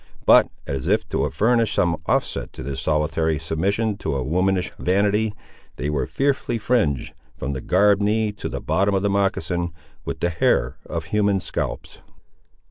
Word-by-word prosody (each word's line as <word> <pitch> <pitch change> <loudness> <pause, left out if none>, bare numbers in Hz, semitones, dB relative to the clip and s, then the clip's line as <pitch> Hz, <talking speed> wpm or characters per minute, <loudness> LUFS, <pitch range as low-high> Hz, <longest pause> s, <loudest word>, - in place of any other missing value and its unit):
But - - +7 0.2
as 70 -1 -3
if - - +2
to - - 0
furnish 115 0 +2
some 85 -3 +1
offset - - 0
to - - -8
this 70 0 -4
solitary 80 +1 +1
submission 100 +7 -1
to 85 - -2
a 65 - -1
womanish 90 +4 +1
vanity, 105 +3 +1 0.4
they 70 +3 -2
were 75 -2 -1
fearfully 135 -3 0
fringed, 105 - 0 0.2
from 70 +3 -3
the 65 - -4
gartered 100 +5 +3
knee 105 +1 +1
to 105 - -6
the - - -5
bottom 100 +1 +1
of 95 - 0
the 100 - +2
moccasin, 95 -3 0 0.3
with - - -5
the 85 - 0
hair 65 -5 +1
of 80 -2 -4
human 100 +3 +1
scalps. - - -4
95 Hz, 165 wpm, -23 LUFS, 80-105 Hz, 0.4 s, But